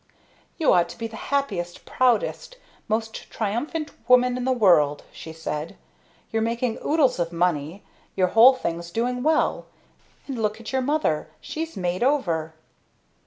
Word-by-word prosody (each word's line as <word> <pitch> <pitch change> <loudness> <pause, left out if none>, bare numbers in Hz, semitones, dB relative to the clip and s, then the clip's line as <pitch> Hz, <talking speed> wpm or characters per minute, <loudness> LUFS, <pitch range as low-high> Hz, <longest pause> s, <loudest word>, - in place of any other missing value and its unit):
"You 320 - +3
ought 175 -1 +3
to - - -10
be 230 - -4
the 225 0 -7
happiest, 195 -12 -2
proudest, 255 - 0 0.3
most 220 0 -3
triumphant 285 +9 -3 0.2
woman 250 0 +5
in 250 0 -3
the 260 - +2
world!" 170 - +3
she 160 - -9
said. 160 -1 -5 0.5
"You're 225 -1 0
making 230 +1 -1
oodles 295 - +2
of 170 -1 -1
money, 170 0 -1 0.3
your 185 -1 +2
whole 240 +6 +7
thing's 170 -7 -4
going 245 +5 -1
well, 310 +3 +1 0.6
and 260 -5 -4
look 215 +1 -1
at 230 - -8
your 265 - +2
mother 265 - 0
she's 325 +1 -6
made 180 -1 -2
over!" 170 - 0
225 Hz, 150 wpm, -24 LUFS, 175-255 Hz, 0.6 s, whole